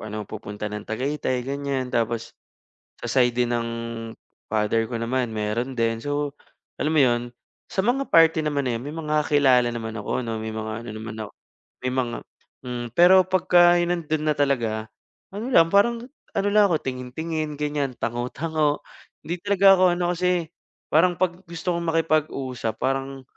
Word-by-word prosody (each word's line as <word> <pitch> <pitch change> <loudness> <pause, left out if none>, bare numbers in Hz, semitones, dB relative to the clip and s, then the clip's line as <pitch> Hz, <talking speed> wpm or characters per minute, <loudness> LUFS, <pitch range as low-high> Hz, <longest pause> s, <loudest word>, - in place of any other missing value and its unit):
parang 105 0 -5
pupunta 105 0 -7
ng 105 0 -5
Tagaytay 130 +1 -2
gan'yan 135 -1 -3
tapos 115 -1 -1 0.7
sa - - -2
side 120 -1 +3
din 120 - -2
ng 120 -1 0 0.8
father 110 +1 +1
ko 120 - -5
naman 115 0 -1
meron 115 +5 -2
din. 115 -1 0
So, 145 +1 -2 0.5
alam 155 - 0
mo - - +5
yun 120 -1 +3 0.5
sa - - -5
mga 265 +4 +1
party 165 -1 +5
naman 145 -3 -1
eh, 115 - -2
may 140 +4 -6
mga 155 -1 0
kilala 130 -4 +4
naman 115 -2 -4
ako 125 +4 -2
'no, 115 -1 -3
may 110 0 -4
mga 110 +1 -4
ano - - -5
naman 110 0 -7
ako - - -16 0.6
may 125 - 0
mga 120 -2 -1 0.5
hmm, 120 -1 -4
pero 185 +2 +8
pagka 175 -1 +5
nandun 170 -3 -1
na 150 - +3
talaga 115 -6 0 0.4
ano 210 +5 -5
lang 165 0 +6
parang 230 +4 +3 0.3
ano 200 +1 +1
lang 210 0 +5
ako 160 - +1
tingin-tingin 150 +5 -4
gan'yan 145 -3 -1
tango-tango. 145 +6 -1 0.4
Hindi 175 +2 -4
talaga 200 -1 +6
ako 185 - +2
ano 175 0 -2
kasi 180 -2 0 0.4
parang 175 +3 +4
pag 180 0 0
gusto 170 +1 -3
kong 170 - -3
makipag-usap 145 -7 0
parang 135 0 -2
140 Hz, 160 wpm, -24 LUFS, 120-165 Hz, 0.8 s, pero